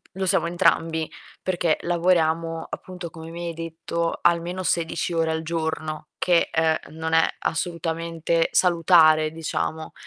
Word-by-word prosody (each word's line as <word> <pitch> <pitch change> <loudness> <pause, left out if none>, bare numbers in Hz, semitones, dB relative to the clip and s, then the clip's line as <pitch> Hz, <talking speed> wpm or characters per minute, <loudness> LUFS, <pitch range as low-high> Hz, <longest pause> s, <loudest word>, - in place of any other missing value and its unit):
lo 190 0 -3
siamo 190 -1 +2
entrambi, 165 -2 +1 0.3
perché 175 -3 +1
lavoriamo" 165 -2 +1
appunto, 180 -2 -7
come 160 0 -10
mi 170 +1 -6
hai 170 - -5
detto, 165 +1 -3
almeno 170 +2 +1
16 170 0 -1
ore 165 -1 +1
al 160 0 -1
giorno, 160 -2 -3
che, 175 -2 +2
uhm, 160 -1 0
non 160 0 -1
è 160 - +5
assolutamente 165 -1 -1
salutare, 165 -3 +5
diciamo. 160 0 -3
165 Hz, 130 wpm, -24 LUFS, 160-170 Hz, 0.3 s, è